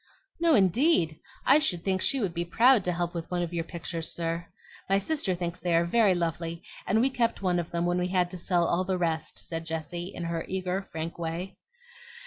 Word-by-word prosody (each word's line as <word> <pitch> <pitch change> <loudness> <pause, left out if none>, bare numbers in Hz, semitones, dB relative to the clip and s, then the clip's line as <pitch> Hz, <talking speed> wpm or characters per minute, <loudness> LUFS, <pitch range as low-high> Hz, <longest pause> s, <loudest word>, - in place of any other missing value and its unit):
"No, 335 -2 +4
indeed; 190 - +3 0.3
I 275 +3 +7
should 180 - 0
think 190 -1 0
she 275 - +2
would 195 -7 -1
be 170 0 -1
proud 230 +6 +5
to 180 - +1
help 175 0 -2
with 170 -2 -5
one 180 -1 0
of 175 0 -5
your 170 -1 -1
pictures, 165 -1 -5
sir. 165 0 -3 0.4
My 195 - +4
sister 200 - 0
thinks 175 0 -4
they 175 -2 +1
are 170 +1 +4
very 200 +1 +4
lovely; 170 0 -2 0.2
and 220 - +3
we 265 +2 +2
kept 235 -5 0
one 180 -2 +2
of 170 - -4
them 170 0 -1
when 175 +1 +1
we 180 - 0
had 180 -1 +1
to 185 - -6
sell 175 0 +1
all 170 +2 +1
the 185 0 -1
rest," 165 -3 -1
said 165 -1 -4
Jessie, 165 +2 -4
in 175 - -6
her 170 -1 -2
eager, 185 0 -2
frank 165 -3 -6
way. 170 +3 -4
175 Hz, 220 wpm, -28 LUFS, 170-195 Hz, 0.4 s, I